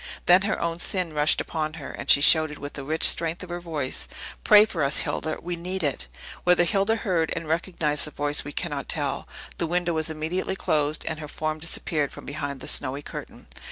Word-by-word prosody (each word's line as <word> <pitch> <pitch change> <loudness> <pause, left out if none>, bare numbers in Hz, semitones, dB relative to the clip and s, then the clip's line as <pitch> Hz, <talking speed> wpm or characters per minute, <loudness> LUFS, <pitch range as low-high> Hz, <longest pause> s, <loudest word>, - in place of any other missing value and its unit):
Then 180 +2 +6
her 200 +2 -1
own 170 0 -2
sin 180 -3 0
rushed 150 0 +3
upon 155 -1 -3
her, 150 -4 -7
and - - -8
she 140 - +7
shouted, 155 0 +5
with 145 0 -7
the 140 - -6
rich 155 +3 +3
strength 165 +2 +2
of 185 - -10
her 175 - -3
voice, 145 - -4 0.4
"Pray 210 0 +8
for 175 -8 -2
us, 140 +1 +3
Hilda; 155 -1 -2
we 175 +1 -3
need 180 +2 -3
it!" 135 - -1 0.4
Whether 180 0 +4
Hilda 200 +5 +1
heard 180 -7 0
and 165 -1 -5
recognized 160 -2 -1
the - - -7
voice 145 0 -1
we 145 - -7
cannot - - -4
tell. - - 0 0.3
The 170 - 0
window 175 0 0
was 160 0 -1
immediately 160 +5 -2
closed, 150 -4 0
and 155 -1 -3
her 150 - -6
form 155 +1 -3
disappeared 155 -2 -2
from - - -11
behind 140 -1 -5
the - - -7
snowy 140 +3 +3
curtain. - - -9
160 Hz, 210 wpm, -25 LUFS, 150-175 Hz, 0.4 s, Pray